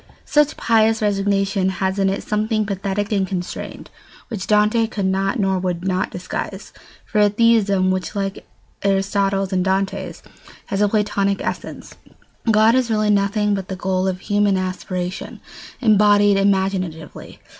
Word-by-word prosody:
] - - -34
Such 295 0 +2
pious 225 -1 +3
resignation 195 -2 +1
has 190 +2 -1
in 195 -1 +2
it 195 - -3
something 215 0 0
pathetic 200 +1 -3
and 195 -2 +1
constrained, 180 -1 -6 0.4
which 210 -6 -5
Dante 215 +2 +3
could 205 -3 -3
not 195 +4 0
or 190 -2 +1
would 180 -1 -3
not 185 0 0
disguise. 180 0 -6 0.3
For 210 - -1
a 205 - +5
theism 205 -4 +3
which, 185 +3 -3
like 195 -1 -4 0.3
Aristotle's 195 0 0
and 185 -1 +1
Dante's, 195 +1 -2 0.4
has 195 0 -2
a 205 - +3
Platonic 200 -2 0
essence, - - -6 0.6
God 220 +1 +5
is 255 -1 +1
really 215 -1 +2
nothing 205 +1 +1
but 195 -2 -3
the 190 - -4
goal 185 0 -1
of 185 0 -3
human 205 -1 +1
aspiration 185 -1 -4 0.4
embodied 205 -2 +4
imaginatively. 190 -5 -1
195 Hz, 145 wpm, -20 LUFS, 190-210 Hz, 0.6 s, a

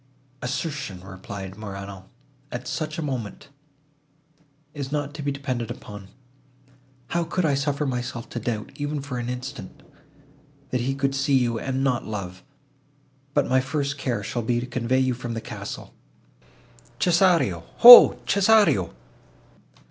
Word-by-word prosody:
"Assertion," 140 - -4
replied 95 0 -8
Morano, 100 -2 -8 0.5
"at 120 - -6
such 155 +5 -4
a 165 - -3
moment, 130 -3 -5 1.2
is 140 -2 -6
not 145 -1 -2
to 155 - -7
be 145 0 -1
depended 130 -4 -4
upon. 105 -2 -9 1.0
How 170 0 0
could 170 +2 -1
I 145 - +2
suffer 140 +1 -1
myself 125 -3 -4
to - - -4
doubt, 110 -3 -4
even 145 0 -3
for 125 -3 -5
an 120 0 -4
instant, 125 +2 -7 0.9
that 125 - 0
he 135 +2 -1
could 135 0 -1
see 135 0 +2
you, 120 -3 0
and 135 +1 -2
not 125 -3 0
love?—But 95 -4 -7
my 130 0 +3
first 140 +1 -3
care 120 -7 -2
shall 120 +4 -3
be 120 +1 0
to 120 - -4
convey 125 0 -1
you 130 -1 +2
from 120 -1 -6
the - - -3
castle. - - -8 1.0
Cesario! 170 - +2
ho,—Cesario!" 205 - +7
130 Hz, 135 wpm, -24 LUFS, 115-145 Hz, 1.2 s, ho,—Cesario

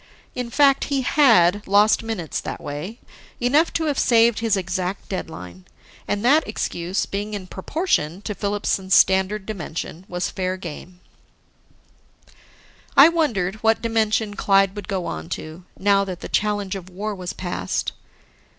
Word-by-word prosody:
In 250 -1 -4
fact, 275 +1 +4
he 280 -2 0
had 210 - +4
lost 205 +2 +4
minutes 220 -9 -4
that - - -6
way, 150 +10 -6 0.4
enough 285 +7 +3
to 325 - 0
have 290 -3 0
saved 230 -1 +4
his 225 -3 +1
exact 185 0 -3
deadline. 90 - -7 0.4
And 205 +2 -1
that 300 +5 +4
excuse, 185 -3 -2
being 205 +1 -4
in 195 -2 -6
proportion 190 - -2
to 210 - -3
Filipson's 200 -1 0
standard 190 +2 +3
dimension, 175 -3 -6
was 180 0 -2
fair 185 0 -2
game. 180 +1 -9 2.0
I 280 +4 +10
wondered 220 - 0
what 225 +1 +1
dimension 220 -2 +1
Clyde 195 -1 +3
would 205 -3 -7
go 185 -3 -2
on 80 +1 -5
to, 160 +3 -10
now 200 0 +3
that 185 -2 -6
the - - -7
challenge 205 -2 0
of 185 -1 -8
war 205 +4 -4
was 180 -2 -6
past. 175 - -3
200 Hz, 145 wpm, -22 LUFS, 180-225 Hz, 2.0 s, I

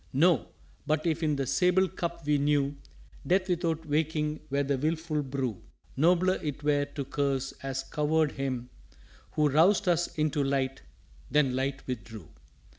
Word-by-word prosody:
_" - - -31
"No. 165 +5 +3 0.4
But 155 +1 +1
if 165 -1 0
in 155 -2 +1
the 135 -1 -1
sable 180 +7 +3
Cup 170 -3 -5
we 150 -1 +2
knew 145 -1 +1 0.5
Death 185 +1 +2
without 165 -2 0
waking 150 0 0
were 140 +1 +1
the 140 0 0
wilful 155 +1 -1
brew, 130 -6 -3 0.3
Nobler 180 +5 +3
it 145 -1 -4
were 145 -1 +2
to 145 -1 -6
curse 135 -1 -1
as 135 -1 -3
Coward 150 +2 +1
Him 130 -3 -4 0.6
Who 150 -1 +3
roused 180 +8 +4
us 175 -1 +3
into 155 -1 +1
light 135 -1 -1 0.5
then 135 -3 +2
light 135 +1 -2
withdrew." 110 - -7
150 Hz, 155 wpm, -29 LUFS, 135-160 Hz, 0.6 s, roused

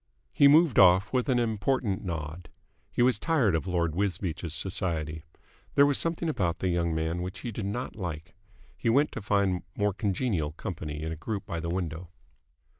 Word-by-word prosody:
He 140 - +6
moved 155 -3 +5
off 95 +4 +6
with 130 +1 +1
an 125 - +3
important 110 -2 0
nod. 85 -1 -5 0.4
He 120 - +2
was 125 -4 +3
tired 135 - +2
of 80 +3 -1
Lord 85 -3 0
Wisbeach's 85 -3 -2
society. 80 -4 -2 0.5
There 140 - +7
was 145 -1 +3
something 165 0 -1
about 90 - 0
the 95 - -1
young 85 -2 0
man 80 +2 -1
which 90 +2 -6
he 120 - -4
did 105 -2 -4
not 120 +5 -4
like. 85 -6 -6 0.4
He - - -1
went 140 +6 +3
to 115 - -6
find 100 -3 +1 0.2
more 105 -1 +1
congenial 100 - -1
company 75 -3 -5
in 80 - -3
a - - -3
group 100 +6 -4
by 85 - -4
the 85 +1 -4
window. 85 -1 -3
95 Hz, 185 wpm, -28 LUFS, 85-115 Hz, 0.5 s, There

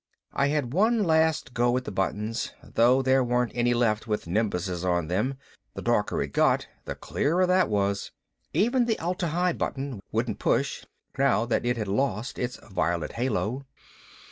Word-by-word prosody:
I 140 - +2
had 140 -4 -1
one 220 +5 +3
last 160 -6 +2
go 120 +1 +2
at 130 - -2
the - - -4
buttons, 105 +4 -2
though 125 +3 +3
there 130 0 +4
weren't 125 0 +1
any 120 0 +2
left 110 -2 +1
with 105 -1 -2
nimbuses 90 -2 -1
on 85 -3 0
them 105 +10 0 0.4
the - - -6
darker - - +1
it - - -7
got, - - +3 0.2
the - - -4
clearer 175 +5 +1
that 180 0 +3
was. 100 -1 0 0.4
Even 240 +4 +2
the 225 -2 0
Atla 175 +1 -2
Hi 175 +2 +1
button 135 -7 -3
wouldn't - - -1
push - - 0 0.3
now 135 -4 +3
that 120 0 0
it 120 0 +1
had 110 -2 -3
lost 110 +3 -1
its 125 0 -3
violet 85 -2 -1
halo. 125 +2 -2
120 Hz, 170 wpm, -27 LUFS, 105-150 Hz, 0.4 s, there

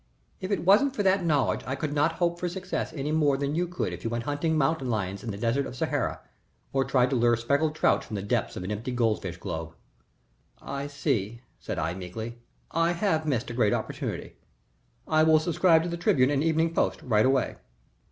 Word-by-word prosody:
If 185 - -5
it 200 -4 -1
wasn't 250 +9 +5
for 205 - 0
that 190 -1 +3
knowledge 145 -7 +1
I 130 - -1
could 145 +1 -3
not 150 +2 +2
hope 170 0 0
for 180 - -1
success 185 -2 -3
any 150 -1 -3
more 150 -3 +3
than 140 +1 -1
you 175 +3 0
could 170 - -3
if 90 - -8
you 115 - -1
went 115 0 -2
hunting 145 +4 0
mountain 135 -2 +1
lions 100 -4 -2
in 120 - -5
the 100 - -4
Desert 120 +5 0
of - - -8
Sahara, - - -1 0.5
or 135 0 +2
tried 130 -1 +2
to - - +2
lure 120 -1 +3
speckled 140 +6 +1
trout - - +2
from 110 - -7
the 100 - -3
depths 100 - -1
of 90 - -4
an 95 - -4
empty 110 +5 -3
goldfish 110 -7 0
globe." 80 -1 -5 0.8
"I 140 +1 -5
see," 125 -6 -2 0.2
said - - -5
I, 80 - -1
meekly. 110 +6 -7 0.3
"I 165 +1 +2
have 170 -4 0
missed 120 -5 -1
a - - -5
great 115 -4 +2
opportunity. - - -4 0.7
I 155 - +3
will 155 0 +6
subscribe 165 +1 +3
to 175 - -3
the 170 - -3
Tribune 140 -6 +3
and 145 0 +1
Evening 165 +1 +2
Post - - 0
right 110 -4 +3
away." 130 +1 +1
140 Hz, 210 wpm, -27 LUFS, 115-160 Hz, 0.8 s, will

